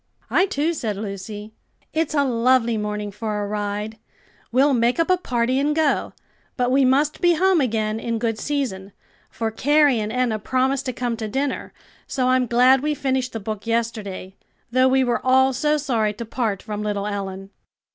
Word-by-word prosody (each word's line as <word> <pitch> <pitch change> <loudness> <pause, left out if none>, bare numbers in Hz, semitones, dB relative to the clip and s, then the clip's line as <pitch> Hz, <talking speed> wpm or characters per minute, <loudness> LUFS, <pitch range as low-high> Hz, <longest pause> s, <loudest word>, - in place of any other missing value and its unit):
"I, 375 - +4
too," 315 0 0
said 220 -10 -3
Lucy. 205 +1 -6 0.4
"It's 315 -1 0
a 285 - +4
lovely 240 -1 +2
morning 210 -1 -3
for 210 0 -3
a - - -3
ride. 210 +1 -3 0.5
We'll 270 +4 +4
make 240 +3 +2
up 330 +2 +2
a - - +6
party 250 -5 0
and 295 +2 +1
go, 310 -3 +1 0.4
but 250 -1 +1
we 270 +1 +4
must 280 +4 +2
be 350 -1 +5
home 370 -1 +3
again 220 -3 -1
in 230 0 -2
good 225 -1 -2
season; 210 -10 -3 0.4
for 225 -1 -3
Carrie 290 +1 +3
and 215 0 -3
Enna 245 -3 0
promised 260 +4 0
to - - 0
come 240 -1 -2
to 220 -1 -4
dinner. 270 +5 -2 0.4
So 255 -2 0
I'm 255 -1 +2
glad 255 +3 +5
we 300 +1 0
finished 260 -2 -1
the 225 - -3
book 215 +1 -6
yesterday, 220 -5 -2 0.4
though 255 +1 +4
we 260 0 +3
were 245 -1 0
all 265 +1 +4
so 300 +4 +1
sorry 230 -7 0
to 235 +3 -7
part 220 -4 -2
from 210 -1 -5
little 205 -1 -2
Ellen." 195 -1 -5
240 Hz, 185 wpm, -22 LUFS, 215-270 Hz, 0.5 s, a